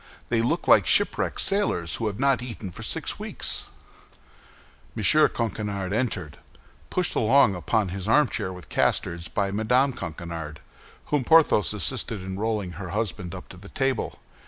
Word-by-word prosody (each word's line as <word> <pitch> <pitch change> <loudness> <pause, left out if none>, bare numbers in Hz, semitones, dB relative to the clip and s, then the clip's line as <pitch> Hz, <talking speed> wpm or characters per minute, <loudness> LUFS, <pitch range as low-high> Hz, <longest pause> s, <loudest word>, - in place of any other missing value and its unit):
They 115 -1 +2
look 115 - -1
like - - +6
shipwrecked - - +2
sailors 140 - +1
who 115 - -2
have 105 +1 -4
not 135 -2 +2
eaten 110 -6 -7
for - - -10
six - - -1
weeks." - - -1 1.3
M. - - -3
Coquenard 100 -4 +1
entered, 105 - -2 0.5
pushed 180 -3 0
along 115 -1 +4
upon 95 +3 0
his 95 +2 -5
armchair 115 -6 +2
with 90 -1 -10
casters 85 0 0
by 100 -1 -1
Mme. 125 +6 +2
Coquenard, 80 -5 -6 0.5
whom 145 -3 +2
Porthos 160 -7 +4
assisted 110 -1 -1
in 95 +1 -5
rolling 105 -4 -1
her 90 - -6
husband 95 -3 -3
up 90 - -9
to 95 - -11
the 100 +2 -12
table. 135 -1 -1
105 Hz, 150 wpm, -25 LUFS, 90-120 Hz, 1.3 s, like